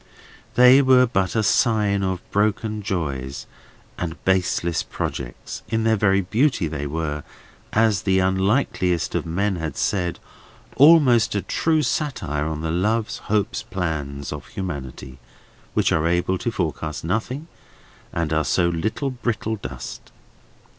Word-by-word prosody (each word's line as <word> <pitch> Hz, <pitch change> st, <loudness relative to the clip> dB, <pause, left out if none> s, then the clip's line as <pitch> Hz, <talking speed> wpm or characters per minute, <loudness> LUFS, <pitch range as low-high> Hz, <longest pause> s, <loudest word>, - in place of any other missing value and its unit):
They 125 Hz, +2 st, +8 dB
were 130 Hz, -1 st, +6 dB
but 95 Hz, -5 st, -1 dB
a 110 Hz, -, +2 dB
sign 105 Hz, -2 st, +2 dB
of 95 Hz, -2 st, -1 dB
broken 105 Hz, +1 st, 0 dB
joys 70 Hz, -10 st, -3 dB, 0.5 s
and 85 Hz, -2 st, -3 dB
baseless 90 Hz, -3 st, +1 dB
projects; 60 Hz, -3 st, -5 dB
in 110 Hz, 0 st, 0 dB
their 110 Hz, 0 st, +3 dB
very 100 Hz, -1 st, +3 dB
beauty 110 Hz, -, +1 dB
they 75 Hz, -2 st, -4 dB
were 75 Hz, -1 st, -3 dB, 0.5 s
(as 110 Hz, -3 st, +3 dB
the 95 Hz, -1 st, +2 dB
unlikeliest 95 Hz, -, +1 dB
of -, -, -2 dB
men 95 Hz, +3 st, 0 dB
had 80 Hz, -2 st, -4 dB
said) 90 Hz, -4 st, 0 dB, 0.6 s
almost 130 Hz, -8 st, +6 dB
a 100 Hz, -, 0 dB
cruel 160 Hz, -2 st, +1 dB
satire 120 Hz, -, -1 dB
on 80 Hz, -1 st, -3 dB
the 80 Hz, 0 st, -2 dB
loves, 105 Hz, +6 st, 0 dB
hopes, 105 Hz, +1 st, 0 dB
plans, 80 Hz, -10 st, -4 dB
of 75 Hz, -, -8 dB
humanity, 65 Hz, -7 st, -6 dB, 0.6 s
which -, -, +2 dB
are 80 Hz, +1 st, +2 dB
able 90 Hz, +2 st, +1 dB
to -, -, -1 dB
forecast 80 Hz, -5 st, -3 dB
nothing, 115 Hz, -, -2 dB, 0.7 s
and 85 Hz, -2 st, -1 dB
are 80 Hz, 0 st, +2 dB
so 85 Hz, +5 st, +2 dB
much 95 Hz, -, -2 dB, 0.2 s
brittle 110 Hz, -1 st, -1 dB
dust. 65 Hz, -9 st, -8 dB
95 Hz, 135 wpm, -23 LUFS, 80-110 Hz, 0.7 s, They